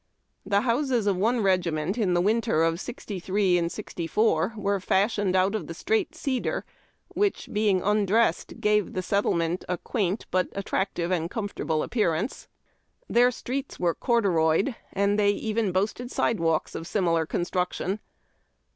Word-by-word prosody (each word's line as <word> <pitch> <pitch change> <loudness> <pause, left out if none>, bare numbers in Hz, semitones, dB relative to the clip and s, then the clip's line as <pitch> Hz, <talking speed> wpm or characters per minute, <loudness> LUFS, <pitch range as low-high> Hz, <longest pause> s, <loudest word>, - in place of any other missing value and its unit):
The 200 0 +3
houses 245 -1 +1
of 200 -2 +2
one 225 +6 +1
regiment 180 -2 +1
in 200 -7 +1
the 175 - +3
winter 215 -4 +2
of 165 +1 +1
'63 190 -4 -1
4 170 +3 0
were 200 -1 0
fashioned 195 0 +1
out 190 +2 +3
of 200 -8 -3
the 165 - -6
straight 420 - 0
cedar, 275 -6 -2 0.4
which, 410 -1 0
being 205 -3 +2
undressed, 210 +2 +1
gave 210 -1 +1
the 185 - -2
settlement 175 -3 0
a 180 - 0
quaint 200 +1 -2
but 185 0 +2
attractive 190 -3 -2
and 170 -2 0
comfortable 200 -8 -2
appearance. 205 -1 -1 0.6
Their 245 +1 +4
streets 260 +3 -5
were 175 -2 +2
corduroyed, 195 - +2 0.2
and 200 +1 +1
they 205 -1 +4
even 215 0 0
boasted 210 +6 -1
sidewalks 165 -11 0
of 165 - -6
similar 165 -6 +1
construction. 180 +3 -2
200 Hz, 140 wpm, -26 LUFS, 175-220 Hz, 0.6 s, Their